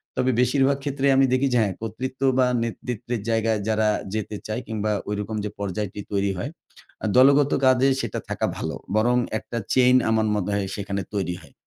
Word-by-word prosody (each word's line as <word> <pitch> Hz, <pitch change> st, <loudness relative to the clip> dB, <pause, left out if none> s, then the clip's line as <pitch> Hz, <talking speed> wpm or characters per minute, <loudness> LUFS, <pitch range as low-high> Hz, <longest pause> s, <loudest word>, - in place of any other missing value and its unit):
তবে 130 Hz, -, +2 dB
বেশিরভাগ 135 Hz, +2 st, +3 dB
ক্ষেত্রেই 140 Hz, -1 st, +1 dB
আমি 135 Hz, -, +6 dB
দেখি 130 Hz, +2 st, +2 dB
যে, -, -, +4 dB
হ্যাঁ, 100 Hz, -3 st, 0 dB
কর্তৃত্ব 125 Hz, +4 st, -5 dB, 0.2 s
বা 130 Hz, -, +5 dB, 0.2 s
নেতৃত্বের 115 Hz, 0 st, -4 dB
জায়গায় 110 Hz, -1 st, +1 dB
যারা 110 Hz, 0 st, +2 dB, 0.3 s
যেতে 110 Hz, -1 st, -3 dB
চায় 110 Hz, +3 st, -3 dB
কিংবা 110 Hz, -1 st, -2 dB, 0.2 s
ঐরকম 105 Hz, +1 st, -3 dB
যে 105 Hz, -, -2 dB
পর্যায়টি 100 Hz, 0 st, -3 dB
তৈরি 100 Hz, -1 st, +1 dB
হয়, 115 Hz, -, -3 dB, 0.5 s
আ -, -, -1 dB
দলগত 140 Hz, +2 st, +6 dB
কাজে 130 Hz, +1 st, +5 dB
সেটা -, -, -3 dB
থাকা -, -, -1 dB
ভালো। -, -, -3 dB, 0.2 s
বরং 120 Hz, +3 st, +3 dB, 0.2 s
১ -, -, -9 dB
টা 120 Hz, -, -1 dB
চেইন 125 Hz, 0 st, +5 dB
আমার 110 Hz, -1 st, +2 dB
মনে 105 Hz, -1 st, -1 dB
হয় 100 Hz, -1 st, -1 dB
সেখানে 100 Hz, -1 st, -3 dB
তৈরি 90 Hz, -3 st, -1 dB
হয়। 70 Hz, -, -18 dB
110 Hz, 185 wpm, -24 LUFS, 105-130 Hz, 0.5 s, আমি